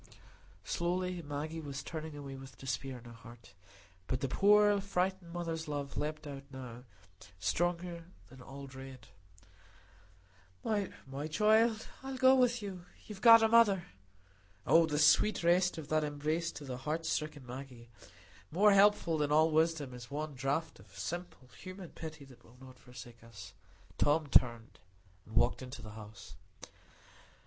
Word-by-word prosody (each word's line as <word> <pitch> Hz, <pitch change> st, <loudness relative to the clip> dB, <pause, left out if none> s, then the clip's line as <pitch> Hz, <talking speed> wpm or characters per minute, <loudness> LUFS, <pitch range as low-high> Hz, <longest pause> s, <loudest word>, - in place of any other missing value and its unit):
Slowly 180 Hz, -, -2 dB
Maggie 155 Hz, +2 st, -5 dB
was 140 Hz, -2 st, -6 dB
turning 155 Hz, -1 st, -6 dB
away 140 Hz, -2 st, -7 dB
with 135 Hz, 0 st, -12 dB
despair 130 Hz, 0 st, -4 dB
in 120 Hz, -, -14 dB
her 120 Hz, -, -10 dB
heart. 115 Hz, 0 st, -14 dB, 0.5 s
But 130 Hz, -, -2 dB
the 135 Hz, -, 0 dB
poor 205 Hz, +6 st, +4 dB
frightened 190 Hz, -2 st, -2 dB
mother's 165 Hz, -2 st, -4 dB
love 145 Hz, -2 st, -4 dB
leaped 155 Hz, +1 st, -3 dB
out 140 Hz, -2 st, -7 dB
now, 125 Hz, -2 st, -9 dB, 0.5 s
stronger 170 Hz, -, -1 dB, 0.2 s
than 130 Hz, +1 st, -14 dB
all 140 Hz, +2 st, -9 dB
dread. 130 Hz, -2 st, -11 dB, 1.5 s
"My 155 Hz, -9 st, -3 dB
child! 220 Hz, +5 st, +3 dB, 0.2 s
I'll 265 Hz, 0 st, -6 dB
go 260 Hz, 0 st, +6 dB
with 245 Hz, -3 st, +3 dB
you. 185 Hz, -3 st, -7 dB, 0.2 s
You've 210 Hz, -2 st, -9 dB
got 230 Hz, -1 st, +9 dB
a -, -, +6 dB
mother." 220 Hz, -5 st, +5 dB, 0.8 s
Oh, 165 Hz, 0 st, +5 dB
the 150 Hz, -2 st, -1 dB
sweet 155 Hz, +6 st, +4 dB
rest 180 Hz, +1 st, +3 dB
of 155 Hz, -3 st, -7 dB
that 155 Hz, 0 st, +2 dB
embrace 150 Hz, +3 st, -2 dB
to 145 Hz, -, -9 dB
the 130 Hz, -2 st, -5 dB
heart 155 Hz, +5 st, -3 dB
stricken 150 Hz, -3 st, -3 dB
Maggie! 125 Hz, -2 st, -9 dB, 0.6 s
More 205 Hz, +5 st, +5 dB
helpful 200 Hz, -5 st, +4 dB
than 150 Hz, -1 st, 0 dB
all 155 Hz, +2 st, +4 dB
wisdom 160 Hz, -4 st, +1 dB
is 125 Hz, 0 st, -10 dB
one 150 Hz, +1 st, -4 dB
draught 140 Hz, +5 st, -2 dB
of -, -, -17 dB
simple 175 Hz, -6 st, -6 dB
human 185 Hz, +5 st, -10 dB
pity 160 Hz, -3 st, -9 dB
that 130 Hz, -3 st, -17 dB
will 120 Hz, +2 st, -19 dB
not 130 Hz, -1 st, -14 dB
forsake 120 Hz, -2 st, -12 dB
us. 100 Hz, -5 st, -11 dB, 0.5 s
Tom 150 Hz, +2 st, +3 dB
turned 120 Hz, -3 st, +2 dB, 0.5 s
and 110 Hz, -, -11 dB
walked 120 Hz, +2 st, +3 dB
into 125 Hz, -1 st, -8 dB
the 110 Hz, -, -9 dB
house. 105 Hz, -8 st, -11 dB
150 Hz, 150 wpm, -33 LUFS, 130-180 Hz, 1.5 s, got